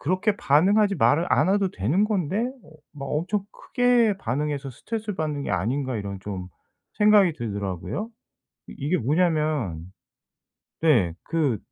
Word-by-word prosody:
그렇게 185 Hz, +6 st, 0 dB
반응하지 200 Hz, +8 st, +3 dB
말 145 Hz, +7 st, +3 dB
않아도 195 Hz, 0 st, +2 dB
되는 140 Hz, -, +1 dB
건데 195 Hz, -4 st, -1 dB, 0.3 s
'어 -, -, -17 dB, 0.2 s
막 140 Hz, -2 st, -7 dB
엄청 185 Hz, +8 st, -1 dB
크게 245 Hz, -4 st, +2 dB
반응해서 140 Hz, -, -2 dB
스트레스를 215 Hz, -, -5 dB
받는 150 Hz, -3 st, -2 dB
게 -, -, -3 dB
아닌가.' 125 Hz, +6 st, -1 dB
이런 100 Hz, -1 st, -5 dB
좀 95 Hz, -2 st, -6 dB, 0.5 s
생각이 210 Hz, -4 st, +5 dB
들더라고요. 100 Hz, -, -4 dB, 0.6 s
이 -, -, -9 dB
이게 150 Hz, +6 st, 0 dB
뭐냐면 150 Hz, -, 0 dB, 0.9 s
네 115 Hz, -, +3 dB
그 145 Hz, -10 st, 0 dB
150 Hz, 280 characters per minute, -24 LUFS, 120-195 Hz, 0.9 s, 생각이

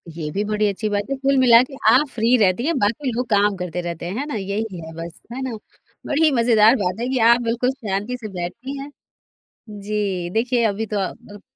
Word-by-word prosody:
ये 155 Hz, -3 st, -4 dB
भी 205 Hz, +5 st, -1 dB
बड़ी 210 Hz, 0 st, +1 dB
अच्छी 210 Hz, +2 st, -3 dB
बात 205 Hz, +3 st, -2 dB
है। 275 Hz, -, +1 dB
कुल 275 Hz, 0 st, +1 dB
मिला 240 Hz, -2 st, +7 dB
के 275 Hz, -, -10 dB, 0.2 s
आप 290 Hz, +3 st, +4 dB
फ्री 230 Hz, +2 st, +2 dB
रहती 200 Hz, +6 st, +2 dB
हैं 335 Hz, -2 st, 0 dB
बाकी 235 Hz, +6 st, 0 dB
लोग 245 Hz, +2 st, -2 dB
काम 205 Hz, -1 st, +3 dB
करते 180 Hz, -1 st, -4 dB
रहते 170 Hz, -1 st, -5 dB
हैं, 180 Hz, +4 st, -4 dB
है 285 Hz, -, -2 dB
ना? 295 Hz, -, -5 dB
यही 200 Hz, -1 st, -3 dB
है 160 Hz, -, -9 dB
बस, 165 Hz, +1 st, -8 dB
है 260 Hz, -, -5 dB
ना? 255 Hz, -4 st, -4 dB, 0.5 s
बड़ी 315 Hz, +3 st, +1 dB
ही 310 Hz, -, +5 dB
मज़ेदार 230 Hz, -2 st, +5 dB
बात 190 Hz, -3 st, -2 dB
है 245 Hz, -, -2 dB
कि 260 Hz, -, 0 dB
आप 240 Hz, -, +3 dB
बिल्कुल 235 Hz, +2 st, 0 dB
शांति 225 Hz, -1 st, -4 dB
से 225 Hz, -, -7 dB
बैठती 250 Hz, +11 st, -5 dB
हैं। 280 Hz, -, -7 dB, 0.8 s
जी। 200 Hz, -4 st, -3 dB
देखिए 235 Hz, +4 st, 0 dB
अभी 215 Hz, +1 st, -1 dB
तो 210 Hz, -1 st, -3 dB
आप 205 Hz, +2 st, -6 dB
215 Hz, 225 wpm, -21 LUFS, 195-250 Hz, 0.8 s, मिला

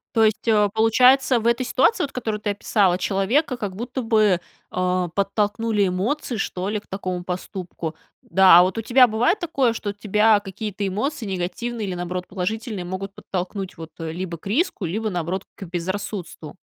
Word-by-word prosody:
То 225 Hz, -1 st, +5 dB
есть, 215 Hz, -1 st, 0 dB
э, 210 Hz, -2 st, +4 dB
получается, 250 Hz, +3 st, +5 dB
в 225 Hz, -, -1 dB
этой 235 Hz, +2 st, +2 dB
ситуации, 385 Hz, -, +2 dB
вот 280 Hz, -, -3 dB
которую 220 Hz, -4 st, -3 dB
ты 210 Hz, -, -2 dB
описала, 200 Hz, -2 st, +2 dB
человека, 210 Hz, -, +1 dB
как 205 Hz, -6 st, -5 dB
будто 245 Hz, +5 st, -4 dB
бы, 215 Hz, -6 st, +3 dB, 0.3 s
а, 180 Hz, 0 st, 0 dB
подтолкнули 205 Hz, +2 st, 0 dB
эмоции, 230 Hz, +9 st, -1 dB
что 185 Hz, -1 st, -3 dB
ли, 210 Hz, 0 st, -1 dB
к -, -, -25 dB
такому 185 Hz, -2 st, -4 dB
поступку. 180 Hz, -2 st, -5 dB, 0.3 s
Да, 185 Hz, -1 st, +7 dB
а -, -, +7 dB
вот 185 Hz, +4 st, -1 dB
у 225 Hz, -, 0 dB
тебя 250 Hz, +3 st, +6 dB
бывает 245 Hz, -, +1 dB
такое, 280 Hz, -, +1 dB
что 205 Hz, -3 st, -4 dB
тебя 210 Hz, +1 st, +3 dB
какие-то 205 Hz, +1 st, -5 dB
эмоции 240 Hz, +6 st, -2 dB
негативные, 200 Hz, +4 st, -3 dB
или, 185 Hz, -, -3 dB
наоборот, 180 Hz, +1 st, -4 dB
положительные 210 Hz, +1 st, -3 dB
могут 190 Hz, +2 st, -5 dB
подтолкнуть, 190 Hz, +1 st, -5 dB
вот, 160 Hz, -1 st, -9 dB
либо 170 Hz, +1 st, -4 dB
к 160 Hz, -, -11 dB
риску, 265 Hz, -, 0 dB
либо, 215 Hz, +6 st, -2 dB
наоборот, 180 Hz, +1 st, -2 dB
к -, -, -9 dB
безрассудству? 180 Hz, -2 st, -5 dB
205 Hz, 170 wpm, -23 LUFS, 185-225 Hz, 0.3 s, Да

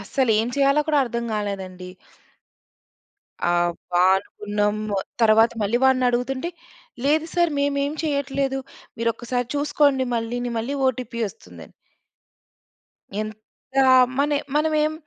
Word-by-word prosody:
అసలేం 225 Hz, +1 st, +1 dB
చేయాలో 275 Hz, +1 st, +4 dB
కూడా 300 Hz, -, +3 dB
అర్ధం 235 Hz, -1 st, -3 dB
గాలేదండి. 190 Hz, -3 st, -4 dB, 1.6 s
అబ్బా! 175 Hz, +1 st, 0 dB
అనుకున్నాము. 210 Hz, +1 st, -2 dB, 0.3 s
తర్వాత 225 Hz, +1 st, +5 dB
మళ్ళీ 215 Hz, +4 st, +1 dB
వాడినడుగుతుంటే, 260 Hz, +3 st, +1 dB, 0.5 s
"లేదు 310 Hz, +3 st, +2 dB
సార్ 345 Hz, -2 st, +3 dB
మేమేం 280 Hz, 0 st, 0 dB
చెయ్యట్లేదు! 275 Hz, -2 st, -1 dB, 0.4 s
మీరొక్కసారి 235 Hz, +1 st, -2 dB
చూసుకోండి 285 Hz, -2 st, +2 dB
మళ్ళీని, 240 Hz, +2 st, -3 dB
మళ్ళీ 255 Hz, +6 st, -3 dB
ఓటీపీ 240 Hz, -2 st, -4 dB
వస్తుందని." 90 Hz, -, -14 dB, 1.5 s
ఎంత 215 Hz, 0 st, -5 dB, 0.8 s
మన 290 Hz, +1 st, +2 dB, 0.3 s
మనవేం 305 Hz, 0 st, +2 dB
245 Hz, 90 wpm, -23 LUFS, 215-280 Hz, 1.6 s, తర్వాత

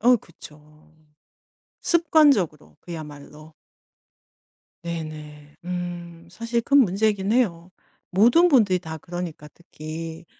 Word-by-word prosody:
어 245 Hz, +2 st, +5 dB
그쵸. 150 Hz, -4 st, -17 dB, 0.9 s
습관적으로 295 Hz, -, +2 dB
그야말로. 155 Hz, -1 st, -10 dB, 1.3 s
네네. 150 Hz, -3 st, -7 dB
음 175 Hz, -1 st, -6 dB
사실 230 Hz, +3 st, -2 dB
큰 280 Hz, +4 st, +4 dB
문제이긴 205 Hz, -1 st, +1 dB
해요. 185 Hz, -8 st, 0 dB, 0.4 s
모든 240 Hz, -, +5 dB
분들이 215 Hz, -, +4 dB
다 160 Hz, -2 st, -7 dB
그러니까 170 Hz, -2 st, -7 dB
특히. 165 Hz, 0 st, -8 dB
175 Hz, 210 characters per minute, -24 LUFS, 155-220 Hz, 1.3 s, 어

